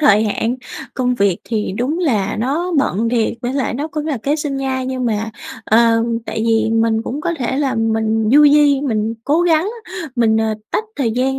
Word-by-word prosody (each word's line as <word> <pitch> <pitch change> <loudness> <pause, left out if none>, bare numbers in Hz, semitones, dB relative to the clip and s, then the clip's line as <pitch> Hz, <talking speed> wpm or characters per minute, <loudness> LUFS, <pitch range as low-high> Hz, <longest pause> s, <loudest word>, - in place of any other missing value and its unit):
thời 215 -7 +5
hạn, 225 +4 -1 0.4
công 250 -1 0
việc 200 -5 +1
thì 215 -4 -2
đúng 285 +8 -1
là 220 - 0
nó 325 +9 -1
bận 230 -3 +1
thiệt 230 -2 +1
với 245 +2 -2
lại 270 -4 -1
nó 295 +5 -3
cũng 305 0 -4
là 285 -6 -1
kế 290 +2 +1
sinh 295 -3 -3
nhai, 260 -1 -2
nhưng 260 -1 -3
mà, 220 -1 -1 0.3
ờm, 230 +1 +3
tại 220 - -3
vì 225 0 +2
mình 225 0 +2
cũng 280 +6 -4
có 340 +2 -1
thể 260 +1 -1
là 280 -2 0
mình 220 -1 0
du 295 +1 +7
di, 290 -1 +5
mình 225 -4 -1
cố 305 +4 +2
gắng, 335 +2 +2 0.5
mình, 225 -2 +3
ờ, 220 -1 +1 0.2
tách 435 - -1
thời 250 -6 0
gian 265 +3 0
245 Hz, 205 wpm, -18 LUFS, 225-285 Hz, 0.5 s, du